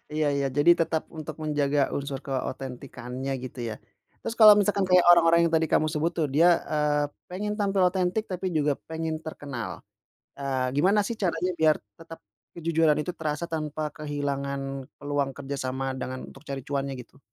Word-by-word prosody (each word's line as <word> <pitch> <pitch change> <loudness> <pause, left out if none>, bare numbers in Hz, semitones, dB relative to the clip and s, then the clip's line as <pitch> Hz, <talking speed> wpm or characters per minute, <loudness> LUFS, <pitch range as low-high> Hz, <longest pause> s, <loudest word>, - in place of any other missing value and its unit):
Iya, 155 -1 +1
iya 140 -1 +1
jadi 150 +4 +6
tetap 160 -1 +1
untuk 155 -1 -6
menjaga 145 -1 +1 0.2
unsur 140 -1 -3
keotentikannya 130 -1 -5
gitu 130 - -8
ya. 110 - -4 0.5
Terus - - -3
kalau 215 -1 +10
misalkan 200 -1 +2
kayak 180 -1 +6
orang-orang 170 -1 +6
yang - - -8
tadi 160 0 +3
kamu 155 - +4
sebut 155 +2 0
tuh 160 -3 +1
dia, 160 +6 +5 0.2
eee, 150 -1 +2 0.3
pengen 210 +3 -3
tampil 200 -2 +1
otentik 185 +3 0
tapi 185 0 -3
juga 150 -1 +2 0.2
pengen 160 0 -2
terkenal, 140 -7 -6 0.6
eee, 130 -2 -1
gimana 190 +8 +4
sih 235 - -3
caranya 180 -1 0
biar 155 -1 +5 0.2
tetap 165 0 -11 0.4
kejujuran 165 -2 +2
itu 180 - -4
terasa 155 +1 -2
tanpa 155 -1 -3
kehilangan 140 -2 -3 0.4
peluang 145 -1 -1
kerjasama 135 -1 -3
dengan 130 0 -5
untuk 135 - -15
cari 135 -1 -4
cuannya 140 -1 -2
gitu? 140 - -23
150 Hz, 165 wpm, -26 LUFS, 140-165 Hz, 0.6 s, kalau